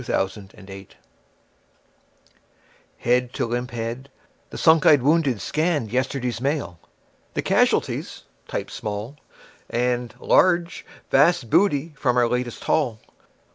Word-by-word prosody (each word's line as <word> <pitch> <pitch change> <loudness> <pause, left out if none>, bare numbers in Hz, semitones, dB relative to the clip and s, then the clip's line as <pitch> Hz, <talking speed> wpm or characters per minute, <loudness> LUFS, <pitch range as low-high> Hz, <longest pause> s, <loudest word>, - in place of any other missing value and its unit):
Smile, 95 -4 0
Smile, 100 -1 -12
Smile 95 0 -11 2.1
Head 125 +1 0
to - - -1
limp 120 +2 -3
head, 120 +3 -5 0.4
the - - -8
sunk 160 -1 +4
eyed 145 -5 +6
wounded 145 -5 +2
scanned 155 - -1
Yesterday's 125 -2 -2
Mail; 135 - -2 0.6
the - - -1
casualties - - 0 0.2
(typed - - -5
small) 105 +6 -5 0.5
And 120 0 -1
(large) 175 -2 +2 0.2
Vast 145 -3 +3
Booty 160 -5 +2
from 125 -3 0
our 120 -1 +4
Latest 125 0 -3
Haul. 125 -8 0
125 Hz, 115 wpm, -23 LUFS, 115-145 Hz, 2.1 s, eyed